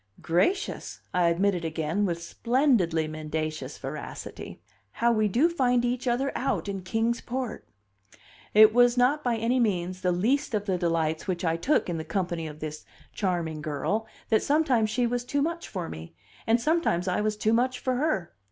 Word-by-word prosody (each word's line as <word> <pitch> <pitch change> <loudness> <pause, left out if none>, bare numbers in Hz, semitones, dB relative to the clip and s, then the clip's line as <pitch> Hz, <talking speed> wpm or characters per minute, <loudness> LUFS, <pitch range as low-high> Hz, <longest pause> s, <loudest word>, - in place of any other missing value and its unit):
"Gracious!" 180 - 0
I 180 -1 +3
admitted 180 +1 +1
again 165 +5 -1
with 170 -1 -3
splendidly 205 - +1
mendacious 155 0 -4
veracity. - - -7 0.3
"How 235 +1 +2
we 215 -2 +2
do 245 - +3
find 250 -7 +2
each 245 +1 -2
other 255 +3 +1
out 270 -5 -1
in 195 -1 -3
Kings 225 +5 -1
Port!" 250 - -4 0.9
It 215 0 +8
was 245 0 +5
not 275 +5 +3
by 245 -2 +1
any 235 +3 +1
means 185 -5 0
the 180 -1 +2
least 235 +8 +1
of 205 -1 -1
the 185 -3 0
delights 165 -1 0
which 180 -1 -2
I 165 0 +2
took 260 - +1
in 170 -2 -2
the - - -4
company 175 -3 -2
of 150 0 -10
this 155 0 -6 0.3
charming 170 -6 -2
girl 155 +9 -2 0.2
that 220 - +4
sometimes 275 -7 +2
she 245 +3 +1
was 245 +1 -1
too 280 +3 0
much 335 +2 -3
for 180 -4 -4
me, 80 +1 -9 0.3
and 230 +2 +4
sometimes 245 - +1
I 180 +2 +1
was 210 0 -1
too 215 +1 +1
much 250 +2 +2
for 255 -2 -1
her. 250 - -1
210 Hz, 180 wpm, -27 LUFS, 170-245 Hz, 0.9 s, It